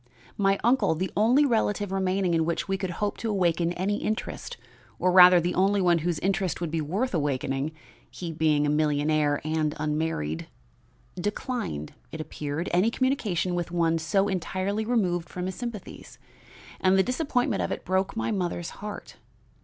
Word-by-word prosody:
My 195 -1 +2
uncle 240 -8 +3
the 185 +4 -2
only 245 +8 +4
relative 205 -5 0
remaining 190 -1 0
in 165 -1 +3
which 170 +1 -2
we 195 - 0
could 190 -1 -3
hope 205 +4 -2
to 230 - -3
awaken 175 -4 +1
any 195 +4 -1
interest, 215 +1 -4 0.4
or 185 - +2
rather, 180 -1 +9
the 175 +1 -1
only 200 +2 +2
one 175 -3 +3
whose 170 0 -1
interest 190 -2 0
would 170 -3 -3
be 165 -1 -1
worth 200 - -1
awakening, 140 -2 -1 0.4
he 175 -2 -6
being 155 -2 +2
a - - +1
millionaire 150 0 +1
and 155 -1 -1
unmarried 150 - -2 0.7
declined, 205 - -3 0.2
it 160 - -7
appeared, 155 +1 -4
any 185 +6 +4
communication 225 - 0
with 175 -1 -2
one 165 -1 +1
so 195 +5 +1
entirely 190 +3 -2
removed 185 -8 0
from 180 0 -4
his 185 - -3
sympathies; 235 -4 -8 0.6
and 190 0 +3
the 190 - +5
disappointment 250 - 0
of - - -2
it - - -4
broke 190 +2 0
my 225 - -1
mother's 175 -4 -2
heart. 210 0 -7
180 Hz, 165 wpm, -26 LUFS, 160-205 Hz, 0.7 s, rather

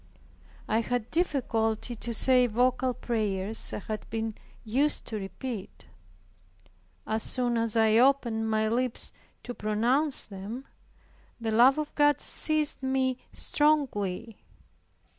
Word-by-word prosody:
I 220 - +2
had 245 0 -3
difficulty 240 -8 0
to 235 +1 -4
say 250 +2 +4
vocal 250 +2 +1
prayers 215 -3 -1
I - - -3
had 215 0 -6
been 225 0 -3 0.3
used 265 +7 0
to 220 -2 -4
repeat. 200 +2 -7 1.2
As 220 +1 -1
soon 245 0 0
as 230 -1 +1
I 220 0 +4
opened 235 -4 +2
my 220 0 +1
lips 245 +2 -1 0.3
to 245 - -5
pronounce 245 +8 +1
them, 210 +6 -7 0.7
the 225 -1 -2
love 245 +5 +6
of 305 -1 -3
God 290 0 +3
seized 310 -2 +1
me 260 -1 0
strongly. 235 -9 0
235 Hz, 120 wpm, -28 LUFS, 220-260 Hz, 1.2 s, love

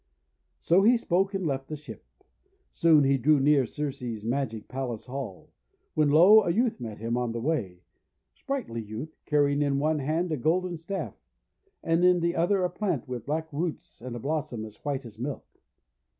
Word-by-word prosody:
So 175 +3 +4
he 235 +4 +5
spoke, 195 -1 0
and 190 -2 -2
left 135 -3 -2
the 155 - -5
ship. 150 +1 -11 0.7
Soon 160 -3 +5
he 135 0 +3
drew 150 +4 +4
near 140 -2 +3
to - - -20
Circe's 125 -7 -4
magic 115 -3 -2
palace 125 -4 -4
hall. 125 -7 -7 0.4
When, 155 -2 +3
lo! 180 +9 +8
a 195 - -1
youth 225 - +1
met 110 -4 -6
him 115 +2 -2
on 120 -2 -1
the 115 - -3
way, 120 - -1
a 90 - -26 0.6
sprightly 245 - -3
youth, 110 +9 -7
carrying 145 -1 +2
in 140 -1 +1
one 155 +2 +1
hand 160 +5 -1
a 155 - 0
golden 175 +6 0
staff, 165 - -4 0.7
and 165 +1 +2
in 180 0 +5
the 170 0 0
other 185 +3 +2
a 180 - +1
plant 180 - -2
with 125 -2 -6
black 160 +1 -3
roots 160 -5 -4
and 125 0 -6
a - - -5
blossom 140 -4 -3
as 110 -1 -12
white 140 -3 -2
as 110 -1 -12
milk. 135 +3 -4
145 Hz, 190 wpm, -27 LUFS, 125-170 Hz, 0.7 s, lo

